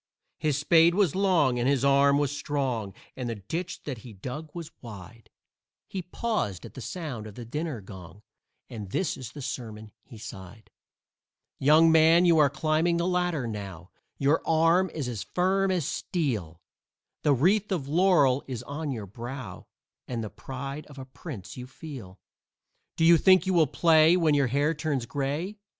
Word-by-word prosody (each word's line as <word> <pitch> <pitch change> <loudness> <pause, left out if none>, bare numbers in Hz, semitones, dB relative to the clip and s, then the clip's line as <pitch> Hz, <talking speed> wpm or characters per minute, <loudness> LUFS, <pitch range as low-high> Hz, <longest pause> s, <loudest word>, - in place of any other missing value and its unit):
His 150 -3 0
spade 165 +3 +4
was 195 -7 +2
long 175 -10 +2
and 120 +2 +1
his 140 -1 +1
arm 140 +1 +5
was 145 -1 0
strong, 130 -9 -2 0.2
And 125 -2 -4
the 115 - -3
ditch 165 - -5
that 130 -6 -5
he 115 0 -11
dug 130 +10 -7
was 170 -3 -7
wide; 110 -1 -11 0.6
He 190 - -4
paused 180 - -3
at - - -11
the 130 - -9
sound 130 -7 -6
of 105 - -11
the 120 - -8
dinner 150 0 -4
gong 95 +1 -12 0.4
And 105 -4 -8
this 185 - -1
is 130 -2 -9
the 145 - -8
sermon 110 -5 -6
he 115 - -13
sighed: 105 -1 -11 0.9
"Young 155 +4 +6
man, 160 +2 +6
you 170 -2 +5
are 145 -2 +5
climbing 155 +3 +1
the 170 - 0
ladder 180 -6 0
now 100 -5 -7 0.3
Your 145 +4 +2
arm 165 +3 +3
is 150 -5 -4
as 115 -5 -4
firm 190 - +1
as 180 -6 0
steel; 110 - -3 0.6
The 145 -2 +3
wreath 195 - +2
of 160 -8 -2
laurel 150 -5 +3
is 125 -3 -5
on 145 +2 -4
your 110 -5 -5
brow 115 0 -8 0.4
And 120 -3 -3
the 110 - -6
pride 135 +3 -7
of 145 - -14
a 135 - -7
prince 130 - -9
you 125 0 -7
feel. 125 - -10 0.8
Do 165 - +2
you 170 0 +7
think 185 +2 +5
you 190 - 0
will 165 -4 +4
play 160 +4 +5
when 160 -4 +3
your 140 -2 +3
hair 145 +5 +1
turns 150 -5 -2
gray? 145 - -3
140 Hz, 175 wpm, -27 LUFS, 120-165 Hz, 0.9 s, you